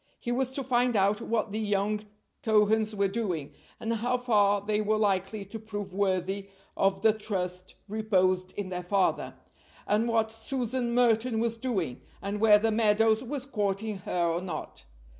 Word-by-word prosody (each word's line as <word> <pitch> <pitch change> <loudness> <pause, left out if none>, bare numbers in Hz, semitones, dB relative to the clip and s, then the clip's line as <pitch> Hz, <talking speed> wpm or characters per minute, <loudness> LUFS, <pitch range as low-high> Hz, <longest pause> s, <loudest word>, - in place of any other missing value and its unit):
He 240 - -3
was 255 +1 0
to 275 - -3
find 245 -1 +2
out 200 +2 +2
what 225 -2 -1
the 215 - -2
young 210 0 0 0.4
Cohens 215 -2 +3
were 200 -1 +2
doing, 190 -8 -3 0.3
and 225 +1 -1
how 240 +3 0
far 205 -5 +3
they 210 +1 0
were 215 +1 +1
likely 200 0 0
to 220 +3 -8
prove 205 -3 -6
worthy 195 0 -1 0.3
of 195 0 +1
the 220 - +6
trust 185 -4 -4
reposed 185 -4 +1
in 200 -2 -3
their 180 -1 -3
father; 190 +1 0 0.5
and 215 +3 +1
what 225 -1 +1
Susan 240 +1 -2
Merton 235 -1 +3
was 230 0 0
doing, 200 - -2 0.2
and 200 +1 -4
whether 220 0 +5
Meadows 220 0 +3
was 265 +1 -4
courting 210 -4 -2
her 180 -1 -2
or 170 +1 0
not. 165 - -6
210 Hz, 160 wpm, -28 LUFS, 195-225 Hz, 0.5 s, the